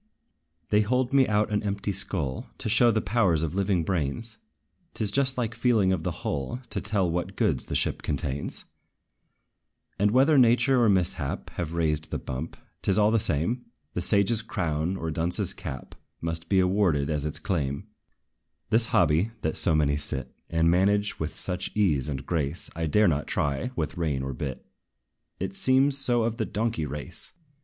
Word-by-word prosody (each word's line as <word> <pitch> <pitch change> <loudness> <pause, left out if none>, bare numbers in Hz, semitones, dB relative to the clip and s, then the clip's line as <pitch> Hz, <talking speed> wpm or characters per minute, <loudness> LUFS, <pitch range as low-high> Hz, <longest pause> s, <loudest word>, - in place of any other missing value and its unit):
They 105 0 +5
hold 125 +4 0
me 135 -2 +5
out 105 0 +1
an 105 - +1
empty 100 0 -2
skull, 90 -8 -2
To - - -5
show 120 +3 +5
the 110 -1 +1
powers 95 -8 +2
of 80 - -2
living 95 -2 +1
brains: 95 +7 -2 0.6
'T - - -1
is 100 - +1
just 135 +1 +2
like 115 -3 -1
feeling 110 -7 +2
of 90 - -2
the - - -2 0.2
hull, 70 - -2
To - - -2
tell 100 -3 0
what 85 +1 -3
goods - - 0
the - - -3
ship - - 0
contains. 70 -1 -2 1.3
And, 105 +1 +3
whether 135 +6 +4
nature 125 +1 +4
or 110 - +4
mishap 95 -3 0
Have 85 -2 -4
raised 80 -2 0
the - - -2
bump, 65 +5 -6 0.2
't - - -1
is 95 - +3
all 105 0 +4
the 115 - +3
same; 100 - 0 0.3
The - - -2
sage's 100 +3 +3
crown, 85 -4 -2
or 80 -2 -3
dunce's 85 +3 +1
cap 65 -1 -7 0.3
Must 80 0 -3
be 95 - +3
awarded 90 -6 +2
as 75 -2 0
its 75 -1 +2
claim. 70 -6 -2 0.9
This 115 +1 +4
hobby, 85 +3 +2
that 80 - -1
so 80 - +5
many 75 -2 +2
sit, 65 -3 -3 0.2
And 80 0 +2
manage 100 +3 +1
with 80 0 -5
such 90 -1 -3
ease 75 -10 +1
and 65 -2 -4
grace, 80 -1 -2
I 80 0 -2
dare 105 +7 +4
not 75 -3 0
try 70 - -1
with 80 -3 -3
rein 75 -6 -1
or 70 0 -4
bit, 65 0 -6 0.7
It 95 +1 -3
seems 135 +4 +4
so 120 -4 +1
of 115 0 -1
the 110 - -1
donkey 110 -8 -2
race. 75 +5 -4
90 Hz, 180 wpm, -26 LUFS, 75-110 Hz, 1.3 s, They